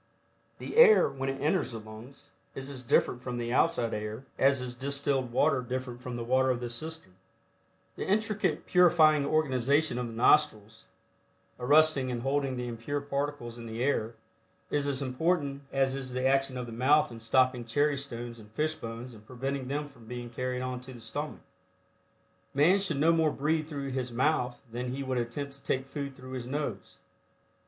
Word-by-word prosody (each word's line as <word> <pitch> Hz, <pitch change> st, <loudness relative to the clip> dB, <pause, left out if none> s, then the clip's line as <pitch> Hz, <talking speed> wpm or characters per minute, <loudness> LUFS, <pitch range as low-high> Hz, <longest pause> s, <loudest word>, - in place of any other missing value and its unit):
The -, -, -6 dB
air, 475 Hz, -2 st, +8 dB
when 135 Hz, 0 st, -3 dB
it 135 Hz, 0 st, -3 dB
enters 150 Hz, -1 st, 0 dB
the 115 Hz, -, -5 dB
lungs 110 Hz, +5 st, -12 dB, 0.2 s
is 135 Hz, +1 st, -6 dB
as 130 Hz, -2 st, -7 dB
different 125 Hz, 0 st, +2 dB
from 125 Hz, -1 st, -4 dB
the 120 Hz, 0 st, -2 dB
outside 130 Hz, -6 st, +2 dB
air, 105 Hz, +4 st, -5 dB
as 140 Hz, 0 st, +4 dB
is 125 Hz, -1 st, -4 dB
distilled 140 Hz, 0 st, -1 dB
water 140 Hz, +2 st, +3 dB
different 125 Hz, 0 st, -5 dB
from 125 Hz, -1 st, -5 dB
the 120 Hz, -, -3 dB
water 130 Hz, +2 st, +2 dB
of 125 Hz, -2 st, +1 dB
the 120 Hz, -1 st, -5 dB
cistern. 155 Hz, -, -6 dB, 0.8 s
The -, -, -4 dB
intricate 215 Hz, +1 st, 0 dB
purifying 155 Hz, -5 st, +5 dB
organization 145 Hz, -2 st, +2 dB
of 125 Hz, -, -2 dB
the 115 Hz, -, -8 dB
nostrils, 115 Hz, -3 st, +2 dB, 0.7 s
arresting 145 Hz, 0 st, +4 dB
and 120 Hz, -1 st, -3 dB
holding 135 Hz, -1 st, 0 dB
the 125 Hz, 0 st, -3 dB
impure 120 Hz, +5 st, -3 dB
particles 140 Hz, -4 st, -3 dB
in 115 Hz, -, -8 dB
the 115 Hz, +2 st, -3 dB
air, 115 Hz, -5 st, 0 dB, 0.6 s
is 145 Hz, -1 st, 0 dB
as 140 Hz, -1 st, -1 dB
important 140 Hz, +1 st, 0 dB
as 135 Hz, -1 st, +2 dB
is 130 Hz, -2 st, -5 dB
the 130 Hz, +1 st, -1 dB
action 135 Hz, -1 st, +2 dB
of 125 Hz, -, -3 dB
the 120 Hz, -, -9 dB
mouth 130 Hz, +6 st, +3 dB
in 115 Hz, -, -8 dB
stopping 125 Hz, +1 st, +2 dB
cherry 145 Hz, +6 st, +1 dB
stones 120 Hz, -4 st, -6 dB
and 105 Hz, -1 st, -14 dB
fish 155 Hz, +8 st, -1 dB
bones 115 Hz, -1 st, -7 dB
and 110 Hz, -1 st, -15 dB
preventing 135 Hz, +1 st, -3 dB
them 145 Hz, +2 st, -2 dB
from 120 Hz, -6 st, -17 dB
being 120 Hz, 0 st, -6 dB
carried 125 Hz, +1 st, -2 dB
on 125 Hz, -1 st, -4 dB
to 130 Hz, +1 st, -10 dB
the 120 Hz, -, -11 dB
stomach. 145 Hz, +6 st, -5 dB, 1.1 s
Man 170 Hz, +8 st, +5 dB
should 175 Hz, -7 st, -1 dB
no 155 Hz, +4 st, +4 dB
more 160 Hz, -2 st, +3 dB
breathe 155 Hz, +2 st, 0 dB
through 140 Hz, -3 st, -4 dB
his 130 Hz, -1 st, -3 dB
mouth 125 Hz, 0 st, 0 dB
than 125 Hz, +2 st, -3 dB
he 140 Hz, -, -3 dB
would 130 Hz, -2 st, -1 dB
attempt 135 Hz, +4 st, -4 dB
to 140 Hz, -, -13 dB
take 130 Hz, 0 st, -1 dB
food 140 Hz, -1 st, -5 dB
through 130 Hz, 0 st, -11 dB
his 125 Hz, -2 st, -5 dB
nose. 130 Hz, -8 st, -4 dB
130 Hz, 185 wpm, -29 LUFS, 120-145 Hz, 1.1 s, air